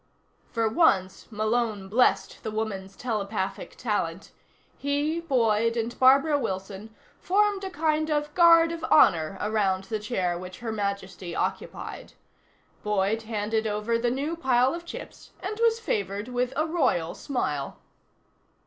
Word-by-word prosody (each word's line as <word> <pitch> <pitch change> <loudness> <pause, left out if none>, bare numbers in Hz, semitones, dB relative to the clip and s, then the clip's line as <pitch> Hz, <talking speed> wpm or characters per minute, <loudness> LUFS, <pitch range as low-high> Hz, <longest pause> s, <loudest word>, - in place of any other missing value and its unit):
For 230 -2 +1
once 210 - +2
Malone 215 -2 -1
blessed 240 +6 +2
the 220 - -4
woman's 205 -3 -4
telepathic 210 -4 -3
talent. 200 -6 -2 0.4
He, 290 +3 -1
Boyd 230 -7 +1
and 230 +1 -2
Barbara 275 +3 +5
Wilson 195 0 -5 0.2
formed 400 +1 +1
a 385 - -3
kind 310 -2 0
of 295 0 -1
Guard 335 -1 +6
of 335 -1 -6
Honor 170 - +4
around 200 -3 0
the 215 +2 -3
chair 185 -6 -1
which 185 0 -8
Her 230 -1 -4
Majesty 200 -4 -4
occupied. - - -4 0.7
Boyd 210 +1 0
handed 220 0 -1
over 215 +2 -1
the 240 +1 +1
new 280 +7 -2
pile 260 -4 +2
of 340 0 -6
chips, - - -10
and 420 +4 -5
was 460 0 +3
favored 205 - -2
with 250 0 -1
a 310 - +1
royal 260 - 0
smile. 150 - -3
225 Hz, 135 wpm, -26 LUFS, 200-295 Hz, 0.7 s, Guard